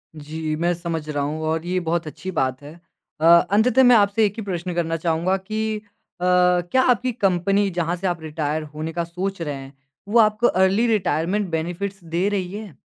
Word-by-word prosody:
जी, 155 +1 -4
मैं 170 +2 +1
समझ 165 -2 -4
रहा 145 -1 -1
हूँ 155 +2 -3
और 160 +1 -1
ये 180 +1 0
बहुत 170 -1 -2
अच्छी 185 +5 -6
बात 130 -3 -1
है। 145 +2 -10 0.5
अ, - - +2
अंततः 210 +9 +5
मैं 245 -1 +7
आपसे 205 +1 +3
एक 200 - -1
ही - - -3
प्रश्न 180 -2 -3
करना 165 -1 -1
चाहूँगा 170 +3 0
कि 215 +2 -3 0.4
अ, - - 0 0.5
क्या 260 - +4
आपकी 250 +2 0
कंपनी 195 -1 +1
जहाँ 175 -1 -1
से 185 +2 -3
आप 175 -2 -2
रिटायर 155 0 -3
होने 155 +2 -5
का 170 - -1
सोच 180 +3 -4
रहे 150 -3 -3
हैं, 135 +1 -10 0.3
वो 225 +3 +3
आपको 215 +2 +4
अर्ली 190 +5 +3
रिटायरमेंट 195 -1 0
बेनिफिट्स 175 +4 -4
दे 170 +3 -1
रही 190 -3 -2
है? 205 -8 -8
175 Hz, 195 wpm, -22 LUFS, 160-200 Hz, 0.5 s, मैं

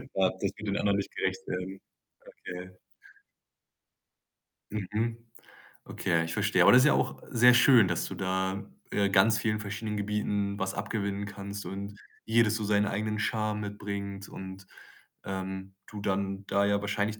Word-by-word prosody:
das 95 0 +1
wird 105 +2 -3
den 100 0 0
anderen 100 -1 +2
nicht 100 - -4
gerecht 95 0 -2
werden. 90 +1 -4 0.5
Okay. 90 +1 -8 2.0
Mhm. 110 +3 -2 0.7
Okay - - -5
ja, 85 -1 +4
ich 80 - -4
verstehe. - - +2
Aber - - +8
das 125 - +8
ist - - +5
ja 150 - +6
auch - - 0
sehr 125 0 +6
schön, 120 -3 +7
dass 85 -2 -1
du - - -6
da, 95 +1 -1 0.3
äh, 100 -1 +2
ganz 100 +4 +5
vielen 110 -1 0
verschiedenen 105 +1 -4
Gebieten 100 -1 -1
was 95 0 -1
abgewinnen 100 0 -2
kannst 100 0 -7
und 100 +1 -6 0.3
jedes 110 -1 +3
so 110 - -2
seinen 105 0 +3
eigenen 105 +1 -2
Charme 105 -1 0
mitbringt 100 -1 -5
und, 95 0 -9 0.6
ähm, 95 0 -5
du 105 - -8
dann 100 0 -2
da 100 +1 +2
ja 100 0 +2
wahrscheinlich 105 +1 -1
100 Hz, 155 wpm, -29 LUFS, 95-105 Hz, 2.0 s, Aber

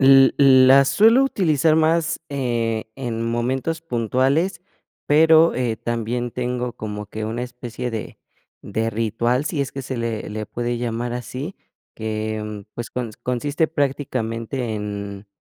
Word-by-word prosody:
L 135 0 +7
l 130 -2 +7
la 135 +1 +7
suelo 220 - +5
utilizar 160 - +2
más, 165 +1 +2
eh, 120 -5 -1
en 120 -4 -3
momentos 130 +7 -1
puntuales, 135 - 0 0.5
pero, 160 +2 +6
eh, 120 -3 -1
también 120 +1 -2
tengo 125 0 -2
como 105 -1 -6
que 110 +1 -5
una 115 +3 -3
especie 125 0 -5
de 110 -2 -6 0.4
de 110 +3 -2
ritual, 115 +4 0
sí 155 -1 -2
es 135 -1 -1
que 135 - -5
se 130 0 -5
le 115 -2 -3
le 110 0 -4
puede 120 +2 -3
llamar 120 0 -2
así, 130 +8 -6 0.4
que, 110 -1 -4
pues, 120 - -6
cons 120 -4 -4
consiste 145 +6 -1
prácticamente 125 -5 -2
en 100 -1 -5
125 Hz, 140 wpm, -22 LUFS, 115-140 Hz, 0.5 s, L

